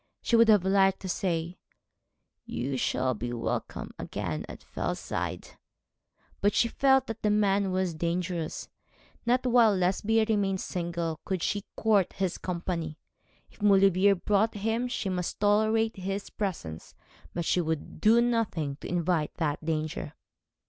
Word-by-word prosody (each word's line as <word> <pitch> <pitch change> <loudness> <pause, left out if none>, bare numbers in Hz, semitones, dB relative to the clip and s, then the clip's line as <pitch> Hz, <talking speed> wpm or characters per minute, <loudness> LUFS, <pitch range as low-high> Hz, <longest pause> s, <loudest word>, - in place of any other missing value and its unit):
She 235 - +2
would 230 0 +6
have 210 -4 +5
liked 195 0 +3
to 190 - -5
say, 175 -1 -2 0.8
'You 135 +3 -3
shall 130 0 0
be 120 +2 -4
welcome 115 - -3
again 90 -7 -4
at - - -10
Fellside,' - - -4 0.9
but 205 +1 +2
she 235 - +3
felt 265 +1 +3
that 225 -3 -6
the 210 - +2
man 200 -2 +2
was 185 -2 0
dangerous. 170 0 -2 0.6
Not 250 +2 +2
while 235 -4 +5
Lesbia 200 +5 +2
remained 200 -3 +1
single 170 -3 -3
could 185 -3 -2
she 205 -1 -1
court 210 -4 +2
his 190 -2 -2
company. 170 -3 -3 0.5
If - - -21
Maulevrier 195 -1 +5
brought 210 +4 +1
him 225 +4 -1
she 240 -4 -3
must 180 -1 -3
tolerate 220 +2 +2
his 195 +2 -4
presence, 160 - -5 0.4
but 170 -1 -2
she 180 - +2
would 160 -2 -4
do 225 +2 +6
nothing 215 -12 0
to - - -8
invite 170 -3 0
that 155 -2 -2
danger. 155 -1 -3
190 Hz, 140 wpm, -28 LUFS, 165-210 Hz, 0.9 s, would